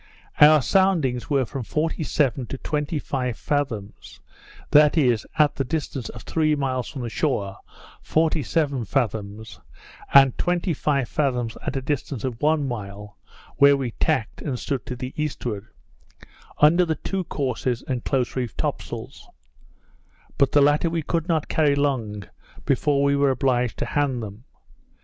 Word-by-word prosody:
Our 150 -1 +7
soundings 160 - +2
were 140 -3 +2
from 135 +3 -5
forty 155 +8 -2
seven 135 -5 0
to 135 - -5
twenty 150 +2 -2
five 125 -4 -3
fathoms; 115 -9 -3 0.5
that 150 +2 +6
is, 125 -7 +2
at 150 -2 +4
the 135 - +1
distance 135 -2 -4
of 110 - -10
three 155 -2 +1
miles 130 -3 -2
from 135 -4 -6
the 120 - -3
shore, 100 -11 -1 0.4
forty 160 -1 +1
seven 140 +1 0
fathoms; 110 -2 -3 0.5
and 135 -2 +7
twenty 175 0 0
five 140 -3 0
fathoms 125 -6 -1
at - - -3
the 135 -2 -3
distance 140 -4 -3
of 125 -3 -4
one 150 -1 +2
mile, 105 -3 -7 0.4
where 140 0 +6
we 130 -3 -3
tacked, 115 0 -1
and 135 -5 -3
stood 135 0 -4
to 125 - -4
the 125 +1 -6
eastward, 120 -8 -3 0.9
under 165 +4 +5
the 160 -2 0
two 190 +3 -3
courses 130 -4 -2
and 125 -3 -2
close 130 -3 -1
reefed 125 -3 -3
top - - -1
sails; - - -9 1.1
but 140 -2 +4
the 145 - +5
latter 145 +4 +3
we 165 -1 -2
could 165 +2 -1
not 160 -4 0
carry 150 -3 +2
long 120 -8 -1 0.4
before 140 +1 +2
we 140 0 +3
were 140 0 +3
obliged 125 -3 0
to - - -2
hand 135 -5 -1
them. 105 +4 -9
135 Hz, 160 wpm, -24 LUFS, 120-150 Hz, 1.1 s, Our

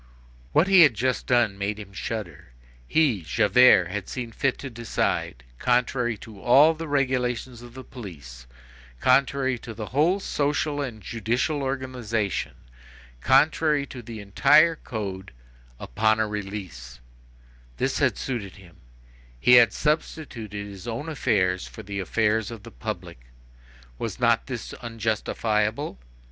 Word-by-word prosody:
What 160 - +4
he 190 -2 +7
had 145 -8 +6
just 130 +4 -1
done 115 -5 +2
made 100 +1 -2
him 100 -2 -10
shudder. 105 - -6 0.3
He, 140 - +2
Javert, 90 +2 +5
had 105 -1 -5
seen 120 -3 -5
fit 135 +3 0
to 135 - -7
decide, 115 - -2 0.2
contrary 120 -1 +1
to 105 -3 -13
all 145 +6 +6
the 165 +1 -7
regulations 125 -3 -1
of 120 0 -13
the 130 - -8
police, 70 - -11 0.5
contrary 130 - +2
to 115 -1 -9
the 110 0 -5
whole 165 +8 +3
social 145 -3 -1
and 115 -7 -6
judicial 120 +6 -1
organization, 125 -6 -2 0.7
contrary 150 - +3
to 130 -3 -9
the 115 -1 -8
entire 145 +11 +4
code, 100 - -6 0.5
upon 110 - +1
a 110 - +1
release; 95 -12 -7 0.8
this - - -1
had - - +2
suited 115 -8 -4
him; 90 -4 -17 0.6
he 125 - +3
had 120 -2 +8
substituted 125 -9 -3
his 100 +1 -10
own 120 +7 -4
affairs 95 - 0
for 110 - -10
the 100 0 -5
affairs 110 +2 0
of 115 -3 -9
the 115 - -11
public; 90 - -6 0.8
was - - -4
not - - +2
this - - -6
unjustifiable? 110 - -1
115 Hz, 135 wpm, -25 LUFS, 100-135 Hz, 0.8 s, had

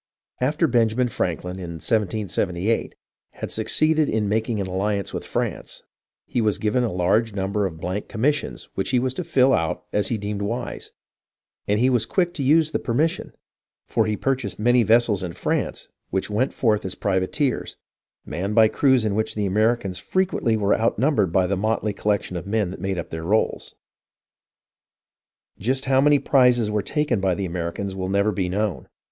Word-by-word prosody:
After 150 +6 +1
Benjamin 120 -2 +2
Franklin, 90 -3 -3
in 85 -3 -6
1778, 100 +1 -1 0.4
had - - -6
succeeded 155 -1 +2
in 110 -1 0
making 110 +1 0
an 100 - -1
alliance 100 +2 -2
with - - -4
France, - - -4 0.4
he 120 - -1
was 105 -2 +1
given 110 +4 +1
a 115 - -1
large 100 +5 +1
num 95 0 -2
ber 105 -1 +1
of 80 -3 -9
blank 90 +4 -3
commissions 115 - -1
which 95 - -2
he 130 - +2
was 130 +1 0
to 180 - -4
fill 135 -5 +3
out 80 -2 0
as 105 -2 +1
he 115 - -1
deemed 105 0 -4
wise, 115 +4 -4 0.8
and 105 +1 +2
he 130 +2 +3
was 120 -3 +2
quick 175 -2 +1
to 160 - -4
use 155 +3 +3
the - - 0
permission, 145 +7 -1 0.5
for 110 -1 +1
he 105 -1 -1
purchased 130 -7 -1
many 120 +3 +4
vessels 115 -2 +3
in 90 -2 -4
France - - -2 0.2
which 95 +2 -2
went 125 +6 +1
forth 110 -4 +1
as 95 - -4
privateers, 100 +8 -1 0.5
manned 100 +4 -3
by 110 -1 +7
crews 130 0 +2
in 105 - 0
which 110 +1 -1
the 105 -1 -1
Americans 105 -1 +1
fre 185 - +1
quently 120 -11 0
were 100 -1 +2
outnumbered 115 - +1
by 95 +1 +3
the 100 +2 0
motley 110 +1 -1
collection 100 -2 -1
of 85 - -5
men 105 -3 0
that 90 - -9
made 95 -1 -2
up 85 - -5
their 80 0 -5
rolls. 105 +6 0 1.8
Just 130 +6 -1
how 135 0 +3
many 145 +1 +5
prizes 125 -6 +3
were 105 0 +1
taken 145 -4 0
by 95 -2 +1
the 95 - -3
Americans 90 +3 -4
will 95 -1 -4
never 100 +2 +2
be 95 -2 -2
known. 105 0 -2
105 Hz, 180 wpm, -23 LUFS, 95-125 Hz, 1.8 s, by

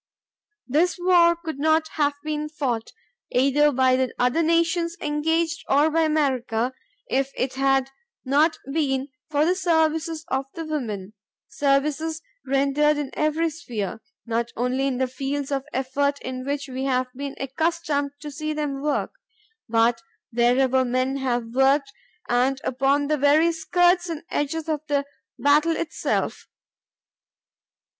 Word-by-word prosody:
This 325 +8 +2
war 350 -1 +5
could 325 -4 -7
not 315 +1 +2
have 290 -1 0
been 300 0 -3
fought, 255 -7 -2 0.4
either 275 +3 +3
by 260 -1 +3
the 260 -1 0
other 250 +6 +2
nations 335 +1 +1
engaged 320 +3 0
or 290 +3 +4
by 325 +1 +2
America, 260 -6 0 0.3
if 270 - 0
it 260 0 -1
had 270 0 +1 0.3
not 295 +5 +3 0.2
been 275 -3 0 0.2
for 295 0 +2
the 355 - +3
services 320 -3 0
of 265 +1 -1
the 330 - -5
women,—services 275 - -2 0.2
rendered 280 +2 +2
in 290 -2 -3
every 315 +2 0
sphere,—not 230 - -5
only 255 +3 0
in 260 -2 -1
the 260 - +1
fields 275 +2 -4
of 270 -1 -1
effort 280 +2 0
in 255 0 -5
which 285 0 -2
we 260 0 -4
have 255 -1 +1
been 275 +1 -6
accustomed 285 0 -1
to 295 -1 -6
see 310 +2 -3
them 290 -3 -3
work, 295 0 -1 0.6
but 230 +3 +3 0.3
wherever 255 +2 +3
men 255 +2 0
have 240 -3 -2
worked 275 +1 +3 0.3
and 255 +2 +2
upon 275 +3 +1
the 300 0 0
very 300 +4 +4
skirts 350 +2 +2
and 325 -2 -5
edges 305 +2 -2
of 305 -2 -1
the 285 -1 +1 0.3
battle 300 +3 +3
itself. 335 - -2
285 Hz, 135 wpm, -24 LUFS, 260-315 Hz, 0.6 s, war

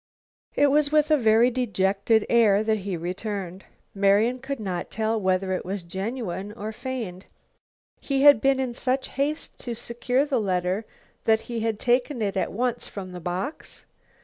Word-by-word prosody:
It 285 -1 +4
was 295 0 +3
with 305 0 +3
a - - +7
very 230 0 +4
dejected 205 -2 +1
air 215 -3 +4
that 220 -1 +1
he 190 -2 -4
returned. 185 +1 -5 0.3
Marian 205 +5 +3
could 270 0 -5
not 185 -5 -4
tell 220 0 -1
whether 185 0 +1
it 185 - -2
was 190 0 -4
genuine 195 +1 -4
or 215 0 -5
feigned. 220 -6 -6 0.7
Had 280 +1 +6
he - - -10
been 270 +2 +2
in 255 -2 -1
such 260 +2 -1
haste 290 +3 -2
to 240 -2 -4
secure 245 +4 0
the 270 -5 0
letter 185 +1 -1 0.4
that 220 0 +4
he 235 -1 -5
had 220 -1 -1
taken 245 +2 +1
it 205 -2 -1
at 190 - -1
once 245 +3 -2
from 190 -2 -7
the 180 -1 -8
box? 180 - -5
220 Hz, 170 wpm, -25 LUFS, 195-255 Hz, 0.7 s, a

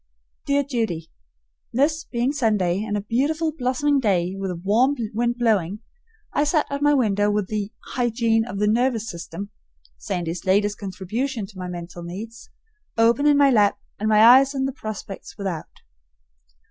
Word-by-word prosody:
Dear 280 0 +2
Judy: 220 - -3 0.6
This 305 +5 +1
being 240 +2 -1
Sunday 210 -9 +1
and 210 -1 -2
a - - -2
beautiful 290 +9 0
blossoming 275 +1 +1
day, 190 -6 +1
with 195 0 -3
a 180 - -3
warm 220 +11 +2 0.2
wind 240 +2 0
blowing, 210 -4 +1 0.5
I 290 - +2
sat 300 0 +2
at 280 0 -3
my 290 0 +4
window 205 -5 +2
with 205 -2 -1
the 210 -1 -3 0.2
"Hygiene 230 -2 +1
of 210 -4 -6
the 210 - +1
Nervous 230 +1 +1
System" 190 +2 -7 0.5
(Sandy's 170 - -3
latest 205 +2 +1
contribution 215 +5 -3
to 195 -1 -13
my 180 - -4
mental 175 0 -7
needs) 210 +7 -8 0.5
open 235 +5 +4
in 290 -1 +5
my 280 -1 +5
lap, 210 -4 +3 0.2
and 215 +1 0
my 215 0 +6
eyes 265 +4 +7
on 265 0 0
the 270 - -2
prospect 200 -9 -7
without. 185 -5 -4
220 Hz, 160 wpm, -23 LUFS, 195-260 Hz, 0.6 s, eyes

